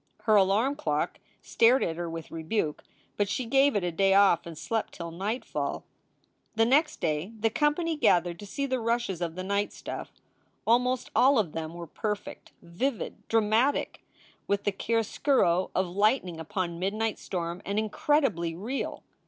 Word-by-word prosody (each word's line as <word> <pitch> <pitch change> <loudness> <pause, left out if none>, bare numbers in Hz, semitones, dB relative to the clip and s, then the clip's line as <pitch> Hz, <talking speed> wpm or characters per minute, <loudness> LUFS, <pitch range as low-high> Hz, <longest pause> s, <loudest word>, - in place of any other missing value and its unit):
Her 215 -2 +4
alarm 210 +8 +3
clock 300 - -1 0.2
stared 240 +3 +4
at 165 - -1
her 170 0 -4
with 165 -1 -7
rebuke, 160 -1 -2 0.3
but 205 -1 +1
she 255 - -2
gave 270 +3 +3
it 200 - +1
a 175 - -1
day 195 +3 +3
off 195 -4 +4
and 165 -2 -8
slept 225 +6 -2
till 170 -1 -6
nightfall. 205 +8 -3 0.7
The 225 +1 +4
next 295 +6 +2
day 160 +6 -1
the 225 +1 +1
company 315 +5 +1
gathered 175 - +2
to 205 - -9
see 280 +7 -2
the 260 -2 -1
rushes 230 -6 -1
of 170 -1 -2
the 185 - -4
night 200 +2 0
stuff. - - -7 0.5
Almost 250 +2 +2
all 270 +2 +5
of 200 -8 +1
them 160 +1 -5
were 175 0 -6
perfect, 210 +5 -5
vivid, 225 +9 -3
dramatic 225 +5 +1 0.4
with 200 0 0
the 205 - +1
chiaroscuro 225 -3 +1
of 185 0 +1
lightning 200 -5 +2
upon 170 +1 -3
midnight 215 +4 -1
storm, 175 -1 -4
and 200 +1 -3
incredibly 215 - +1
real. 230 +10 -4
205 Hz, 160 wpm, -28 LUFS, 175-240 Hz, 0.7 s, all